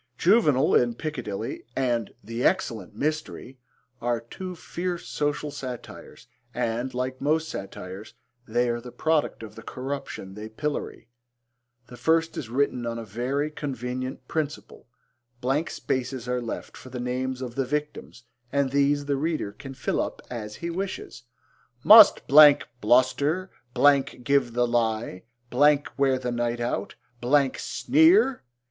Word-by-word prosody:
Juvenal 155 - +4
in 120 -1 +3
Piccadilly 120 -9 -5
and 120 -5 0
The 115 +4 -4
Excellent 115 - 0
Mystery 150 -3 -3 0.4
are 120 0 0
two 180 +11 -8
fierce 175 +1 -4
social 145 0 -2
satires 130 -4 -8 0.3
and, 120 +3 -1
like 130 +1 -3
most 155 +2 +1
satires, 95 -3 -8 0.3
they 120 +2 +1
are 120 0 -2
the 125 0 -10
product 155 -6 0
of 105 -1 -9
the 115 - -11
corruption 130 -6 -6
they 105 +2 -8
pillory. 145 0 -4 0.8
The 125 - -12
first 165 +2 +1
is 115 - -5
written 125 -1 0
on 115 0 -3
a 115 - -6
very 130 +8 -2
convenient 130 -2 -5
principle. 155 -4 -4 0.5
Blank 135 +6 0
spaces 130 -1 -3
are 125 0 -1
left 115 - -6
for 130 - -11
the 125 -1 -6
names 125 +1 -2
of 125 -2 -5
the 135 +1 -1
victims 150 -3 -4 0.3
and 140 -1 +1
these 140 +1 +2
the 140 -1 0
reader 155 -7 -1
can 135 +6 -10
fill 130 - -1
up - - -4
as 105 -3 -6
he 170 0 -4
wishes. 185 -8 -5 0.6
Must 215 -1 +9
bluster, 140 - +5 0.7
give 135 -2 +2
the 120 0 +2
lie, 115 -5 -1 0.3
wear 140 -1 +3
the 125 -1 -3
night 120 0 -1
out, 120 +1 -3 0.6
sneer! 320 - +3
130 Hz, 135 wpm, -26 LUFS, 120-150 Hz, 0.8 s, Must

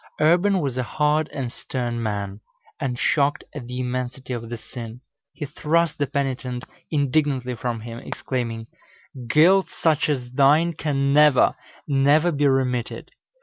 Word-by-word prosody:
Urban 180 +5 +3
was 135 -4 -2
a - - +1
hard 150 +4 +1
and 135 -5 -4
stern 120 -2 -4
man, 100 -2 -3 0.4
and 130 -4 -2
shocked 145 +2 +1
at 130 -5 -7
the 125 +1 -5
immensity 125 +1 -3
of 115 -1 -5
the 120 - -4
sin, 115 0 -9 0.3
he 150 - -6
thrust 155 +2 0
the 145 - +1
penitent 130 -3 -2 0.3
indignantly 140 -3 0
from 120 -1 -3
him, 115 +1 -7
exclaiming, 115 -4 -4 0.6
"Guilt 175 +9 +5 0.2
such 155 -2 +3
as 125 -4 -2
thine 150 +6 +4
can 140 -2 0
never, 150 -3 +5 0.3
never 145 +4 +3
be 145 -2 +2
remitted. 125 -3 -1
135 Hz, 145 wpm, -23 LUFS, 125-150 Hz, 0.6 s, Guilt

